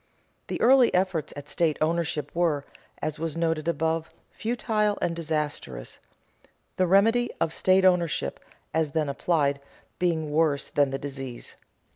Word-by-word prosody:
The - - -3
early 255 0 +6
efforts 180 -4 0
at 145 0 -8
state 160 0 +1
ownership 160 -2 -1
were, 160 -5 +1 0.4
as 155 0 -2
was 165 0 -3
noted 165 -1 0
above, 160 0 0 0.2
futile 215 -3 0
and 170 - -1
disastrous, 150 - -4 0.8
the 185 - +3
remedy 225 +6 +4
of 165 - 0
state 190 0 +3
ownership, 170 - +2 0.3
as 160 -3 0
then 155 -3 0
applied, 140 -1 +1 0.4
being 160 -4 0
worse 150 -2 +1
than 145 -1 +3
the 135 - -2
disease. 135 -3 -7
160 Hz, 135 wpm, -26 LUFS, 145-180 Hz, 0.8 s, early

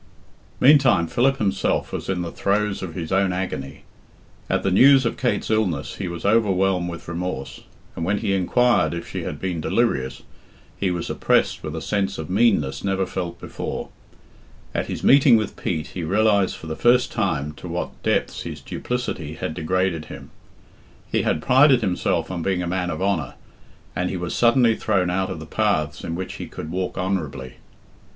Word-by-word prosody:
Meantime 135 - +5
Philip 135 +10 +2
himself 95 -4 0
was - - -4
in 90 -2 -1
the 85 - -5
throes 100 0 0
of 85 -4 -6
his 80 -3 -5
own 95 0 +2
agony. 90 -7 -4 0.7
At - - 0
the 95 - +1
news 135 +6 +6
of 115 - 0
Kate's 125 -3 -1
illness 95 -10 0
he - - -3
was 85 0 -6
overwhelmed 95 -4 +2
with 85 -1 -8
remorse, 85 -5 -4 0.3
and 85 - -4
when 100 +5 +1
he 100 - -1
inquired 120 +3 +2
if 85 - -6
she - - -5
had - - -5
been 90 -4 -3
delirious, 75 - 0 0.5
he 95 - -1
was 90 -1 -3
oppressed - - +1
with 75 0 -5
a 80 - -5
sense 100 -1 -1
of 80 +1 -6
meanness 95 - +2
never 95 -1 0
felt 90 -2 -5
before. - - -5 0.8
At - - -1
his - - -5
meeting 135 -3 +6
with 110 - -3
Pete 80 -3 -3
he 90 - -4
realised 100 +2 +2
for - - -11
the 80 0 -4
first 125 +5 +3
time 80 - -1
to - - -8
what 85 +1 -5
depths - - 0
his - - -6
duplicity 90 -11 -4
had 80 - -4
degraded 85 0 -1
him. - - -10 0.8
He - - +2
had 80 - 0
prided 130 -1 +5
himself 95 -2 0
on 90 -2 -3
being 90 +1 0
a - - -3
man 90 0 -1
of 90 - -3
honour, 90 -10 -1 0.6
and 90 0 -1
he 95 - -3
was 85 -1 -4
suddenly 120 -1 +4
thrown 95 -6 0
out 95 +1 0
of - - -5
the - - -8
paths 75 -1 0
in 85 - -3
which 95 +1 -5
he - - -5
could 80 - -7
walk 90 +1 -3
honourably. 80 -9 -3
95 Hz, 185 wpm, -23 LUFS, 85-105 Hz, 0.8 s, news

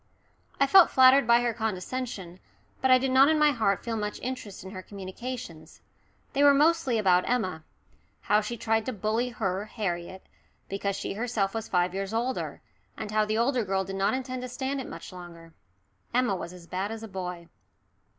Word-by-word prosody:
I 275 - +5
felt 365 +5 +7
flattered 260 -1 +6
by 235 0 +6
her 240 -1 0
condescension, 215 -3 -4 0.4
but 265 - +2
I 255 - +8
did 260 +1 -1
not 270 +2 +6
in 315 - +3
my 300 -1 +5
heart 220 -7 0
feel 230 -1 -3
much 210 -1 -3
interest 250 -6 -6
in 190 - -9
her 185 -2 -7
communications. 190 -3 -8 0.5
They 280 - +2
were 285 -1 +7
mostly 300 -4 +3
about 185 -4 +3
Emma 185 -10 -1 0.6
how 210 +1 +3
she 235 +3 -5
tried 225 0 0
to 255 - -1
bully 220 +5 -1
her, 200 -4 -2
Harriet, 190 -4 -4 0.4
because 200 0 -2
she 200 - -4
herself 215 -2 -1
was 225 -1 -4
five 180 0 +1
years 195 +2 -3
older, 245 +3 -2 0.4
and 210 - -5
how 215 0 +2
the 215 +1 -1
younger 240 +1 +1
girl 190 -1 0
did 195 0 -6
not 195 +6 +1
intend 255 -1 -4
to 255 - -6
stand 265 +2 -3
it - - -8
much - - -9
longer. 170 -2 -11 0.6
Emma 250 -5 +2
was 170 -2 -6
as 180 -2 -12
bad 190 +4 -3
as 225 0 -6
a - - -6
boy. 180 -3 -6
215 Hz, 190 wpm, -27 LUFS, 190-255 Hz, 0.6 s, I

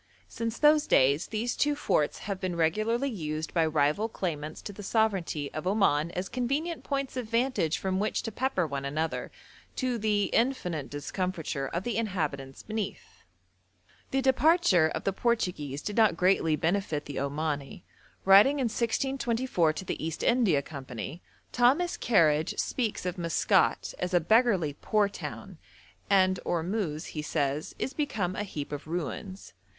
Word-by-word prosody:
Since 230 0 -4
those 300 0 +5
days 140 +4 +3
these 230 +3 -2
two 295 0 +1
forts 150 - 0
have 200 -2 -3
been 185 -2 -2
regularly 215 +11 +1
used 155 -5 -4
by 165 -2 +3
rival 155 +8 +1
claimants 155 -7 -4
to 205 - -6
the 205 - -9
sovereignty 195 -9 0
of 155 +3 -4
Oman 185 -6 +2
as 180 +1 -2
convenient 280 - -2
points 275 -2 -2
of 240 -4 -4
vantage 230 - +1
from 190 0 -1
which 210 +2 -1
to 225 - -4
pepper 240 -6 0
one 140 -2 -4
another, 155 +4 -2 0.4
to 250 -3 -1
the 210 -1 +1
infinite 180 - 0
discomfiture 150 -1 -3
of 170 +5 -3
the 240 0 -2
inhabitants 150 -11 -3
beneath. 215 -2 -5 0.9
The 270 0 0
departure 265 - +4
of - - -4
the 195 - 0
Portuguese 180 - -1
did 210 - -4
not 220 -6 +4
greatly 180 -4 +3
benefit 160 -1 -1
the 145 - -5
Omani. 145 +2 -3 0.4
Writing 200 +9 +7
in 265 - 0
1624 235 - 0
to 190 - -6
the - - -4
East 160 -1 -3
India 210 - +3
Company, 135 +2 -7 0.3
Thomas 275 +9 +3
Kerridge 160 -8 +2
speaks 225 -7 -2
of 180 0 -3
Maskat 170 -2 +2
as 180 0 -1
'a - - +6
beggarly, 190 - +3
poor 210 -1 +2
town,' 200 - -8 0.5
and 185 -2 +4
'Ormusz,' 170 -2 -2
he 150 - -4
says, 150 0 -2
'is 265 - -3
become 205 - -2
a - - -2
heap 150 -9 -5
of 145 +1 -6
ruins.' 180 +3 -5
185 Hz, 155 wpm, -28 LUFS, 155-230 Hz, 0.9 s, Writing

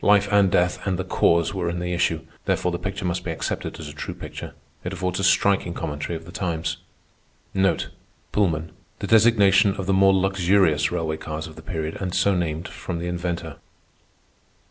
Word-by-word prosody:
Life 100 0 +5
and 100 -2 +5
death 90 0 +2
and 95 -2 +1
the 95 - -2
Cause 85 -1 +2
were 90 -3 -1
in 85 - -3
the 90 0 -2
issue; 85 - +1 0.2
therefore 90 - +1
the 85 - -3
picture 100 0 -4
must 90 0 -1
be - - -4
accepted 80 -3 -3
as 80 - -7
a 75 - -8
true 75 - -6
picture. - - -8 0.3
It 90 - -4
affords 90 0 -2
a - - -1
striking 95 -2 +3
commentary 75 +1 -3
of 80 0 -7
the 85 - -10
times. 85 -2 -2 1.5
Pullman—the 85 -6 0 0.3
designation 105 -3 +5
of 95 - -4
the 95 - +1
more 95 0 +6
luxurious 95 -5 +3
railway 80 -3 -1
cars 80 0 -5
of 80 - -10
the 80 - -10
period 80 -2 -4
and 90 -2 -2
so 100 - +3
named 85 0 -2
from 90 - -5
the 85 - -4
inventor. 85 -3 -3
90 Hz, 185 wpm, -24 LUFS, 80-95 Hz, 1.5 s, more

